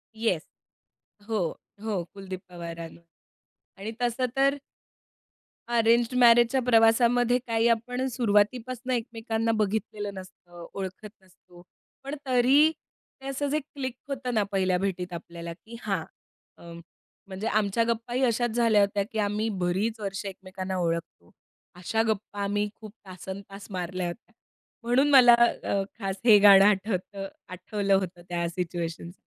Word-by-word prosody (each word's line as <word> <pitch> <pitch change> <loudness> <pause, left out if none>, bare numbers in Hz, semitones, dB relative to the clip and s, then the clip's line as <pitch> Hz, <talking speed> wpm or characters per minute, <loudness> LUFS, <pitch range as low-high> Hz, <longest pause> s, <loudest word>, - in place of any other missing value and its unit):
Yes, 220 -8 0 0.8
हो, 220 -1 -1 0.5
हो 205 -6 -1
कुलदीप 190 -2 -7
पवारांवर 170 -1 -8 0.8
आणि 215 +3 -5
तसं 245 +1 0
तर 275 +1 +3 1.1
अरेंज्ड 235 +1 +3
मॅरेजच्या 240 +2 +6
प्रवासामध्ये 240 +1 +4
काही 230 0 +2
आपण 240 +2 0
अ, - - +1
सुरुवातीपासून 245 +3 0
एकमेकांना 225 -1 -1
बघितलेलं 205 -1 -2
नसतं, 175 -2 -11
ओळखत 195 +2 -6
नसतो. 180 -1 -20 0.4
पण 275 +2 -5
तरी 265 +5 +5 0.5
ते 270 - -8
असाच 275 +1 -2
एक 305 -2 0
क्लिक 260 -3 -3 0.2
होतं 255 -2 -3
ना 215 -2 +2
पहिल्या 185 -2 +1
भेटीत 185 -2 -3
आपल्याला, 170 0 -7
की 225 +7 -13
हां 195 -6 -2 0.5
अ, 170 0 -12 0.6
म्हणजे 195 +3 -5
आमच्या 215 +1 +1
गप्पाही 240 +3 -1
अशाच 240 0 +1
झाल्या 230 -3 +3
होत्या, 200 0 +1
की 220 - -3
आम्ही 210 +2 0
बरीच 210 +6 0
वर्षं 195 0 -4
एकमेकांना 185 0 -6
ओळखतो. 165 - -3 0.4
अशा 205 +5 -1
गप्पा 205 -1 -3
आम्ही 205 +1 0
खूप 215 -2 -11 0.2
तासंतास 195 +2 -9
मारल्यात. 180 +1 -4 0.5
म्हणून 260 +5 +3
मला 250 -4 +8
अ, 235 -4 +2 0.2
खास 195 -2 -2
हे 215 -3 +8
गाणं 200 -1 +8
आठवतं, 195 -1 0 0.2
आठवलं 195 +2 -2
होतं 180 -2 -2
त्या 170 -1 -1
सिच्युएशनसना. 170 -1 -4
210 Hz, 130 wpm, -27 LUFS, 185-235 Hz, 1.1 s, मला